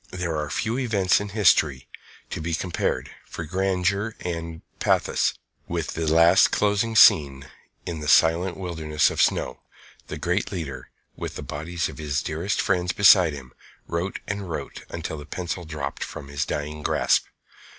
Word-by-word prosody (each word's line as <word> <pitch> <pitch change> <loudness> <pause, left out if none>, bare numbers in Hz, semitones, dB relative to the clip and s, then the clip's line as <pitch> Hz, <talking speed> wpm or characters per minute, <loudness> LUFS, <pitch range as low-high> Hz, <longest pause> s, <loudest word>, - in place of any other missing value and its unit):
There 90 -3 -3
are 75 -1 -2
few 115 - -1
events 100 -7 +2
in 105 - -5
history 85 -10 +3 0.4
to - - -4
be 85 +1 -1
compared, 90 +1 -2 0.2
for 85 - -6
grandeur 95 +4 0
and 85 -2 -5 0.2
pathos, - - +1 0.3
with - - -3
the 80 -1 -1
last 85 +3 +6
closing 105 +2 +1
scene 70 -8 +6 0.4
in 85 -2 -4
that 75 - -6
silent 85 +3 +4
wilderness 80 -5 0
of - - 0
snow. - - 0 0.5
The - - -6
great 90 +4 -1
leader, 80 -8 -6 0.3
with - - -6
the - - -6
bodies 85 +4 -3
of - - -10
his 70 -2 -2
dearest 85 +6 -2
friends 90 -1 +1
beside 90 -5 +6
him, 65 -3 -10 0.3
wrote 85 +3 -3
and 100 -2 -4
wrote 80 - -6
until 80 -2 -5
the 75 - -9
pencil 90 +1 -4
dropped 75 -2 -5
from 70 - -8
his 70 0 -2
dying 75 +1 -4
grasp. - - +2
85 Hz, 160 wpm, -24 LUFS, 75-95 Hz, 0.5 s, last